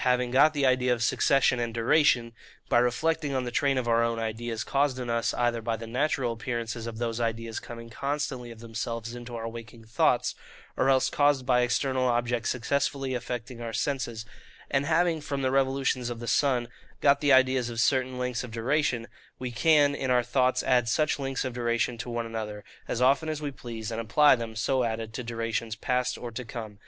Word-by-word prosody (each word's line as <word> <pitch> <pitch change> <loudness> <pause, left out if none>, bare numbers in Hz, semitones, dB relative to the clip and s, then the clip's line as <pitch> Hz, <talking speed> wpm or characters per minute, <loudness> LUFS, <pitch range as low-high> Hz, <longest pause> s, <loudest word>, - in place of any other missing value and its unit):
having 125 -1 +2
got 140 +4 +6
the 140 -2 +2
idea 125 -1 +3
of 120 -1 +1
succession 130 0 +3
and 115 -1 -2
duration, 120 0 +3 0.4
by 120 - +5
reflecting 145 +4 0
on 130 - 0
the 120 - -4
train 140 +2 +1
of 125 -2 -1
our 115 0 +3
own 115 0 0
ideas, 115 0 -3
caused 140 -1 +1
in 125 -2 -3
us 115 0 +1
either 120 -1 0
by 115 0 -2
the 115 - -7
natural 125 0 0
appearances 115 0 -4
of 115 -1 -6
those 115 0 -2
ideas 115 -1 -2
coming 115 -1 -9
constantly 135 0 -3
of 115 -1 -11
themselves 115 0 -5
into 120 0 -8
our 115 0 -4
waking 115 0 -9
thoughts, 110 0 +1 0.4
or 135 - +2
else 130 -1 +4
caused 145 -3 +2
by 125 -1 +3
external 130 +1 +1
objects 120 -1 0
successively 135 +1 -1
affecting 125 0 -5
our 115 -1 -4
senses; 120 -6 -2 0.5
and 140 +1 +1
having 165 -1 +2
from 140 -2 -3
the 130 - +1
revolutions 135 -2 +1
of 120 -1 -5
the 120 - -6
sun 125 -1 +2 0.3
got 140 0 +4
the 145 -1 +3
ideas 130 -2 +4
of 115 -1 -5
certain 130 +2 +1
lengths 125 -1 -2
of 125 - -7
duration,—we 120 0 -2
can 145 +3 +4
in 135 -2 -3
our 125 -1 +3
thoughts 130 +1 +1
add 125 -2 +2
such 150 +4 +1
lengths 135 0 -2
of 130 - -3
duration 120 0 0
to 125 - -5
one 120 -1 -2
another, 110 -2 -5 0.2
as 125 - -1
often 140 +4 +3
as 155 -1 -2
we 145 -2 -4
please, 115 -4 -7
and 115 0 -2
apply 145 +7 +5
them, 115 -2 -6
so 130 +4 +1
added, 110 -1 -3
to 125 - -4
durations 115 -1 -3
past 125 +3 -1
or 120 - -7
to 115 +3 -5
come. 110 -3 -8
120 Hz, 200 wpm, -27 LUFS, 115-135 Hz, 0.5 s, got